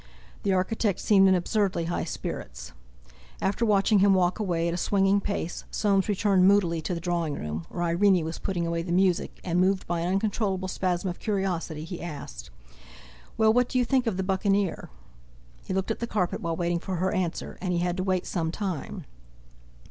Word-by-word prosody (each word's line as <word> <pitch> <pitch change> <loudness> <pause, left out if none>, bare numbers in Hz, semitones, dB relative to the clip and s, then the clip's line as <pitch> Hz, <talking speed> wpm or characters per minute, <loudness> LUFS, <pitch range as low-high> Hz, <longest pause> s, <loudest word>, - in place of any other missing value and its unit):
The 200 - 0
architect 190 +1 0
seemed 195 -2 +5
in 190 - +5
absurdly 185 -1 0
high 175 - -2
spirits. - - -6 0.7
After 205 +4 0
watching 205 0 +4
him 195 0 +5
walk 180 +1 +1
away 170 -5 0
at 170 - -1
a - - -2
swinging 195 +2 +2
pace, 195 -4 -3
Soames 200 -1 +1
returned 195 -2 +3
moodily 180 -5 +3
to 180 - -3
the - - -3
drawing 170 -3 -1
room, 75 - -5
where 175 - -3
Irene 175 0 +3
was 160 +1 -5
putting 175 -3 -2
away 170 0 -1
the 170 +1 -5
music, 180 0 +1
and, 175 0 +1
moved 190 +1 +2
by 175 -1 -1
an 175 +2 0
uncontrollable 195 -2 0
spasm 185 0 -1
of 175 - -4
curiosity, 180 -7 -2
he 170 +2 -7
asked: 140 - -7 0.9
"Well, 220 0 +5
what 245 +1 +2
do 255 - -1
you 250 - +3
think 260 0 +1
of 205 -5 0
'The 190 - -1
Buccaneer'?" 195 0 0 0.8
He - - -6
looked 190 +3 -1
at - - -3
the 235 - -3
carpet 185 -6 -1
while 165 -1 -2
waiting 175 0 0
for 185 +2 -4
her 185 +2 0
answer, 180 -4 -3
and 185 -1 -1
he 175 - +1
had 175 0 0
to 185 - -1
wait 185 -1 0
some 165 -3 -2
time. 185 -5 -4
185 Hz, 195 wpm, -27 LUFS, 170-200 Hz, 0.9 s, seemed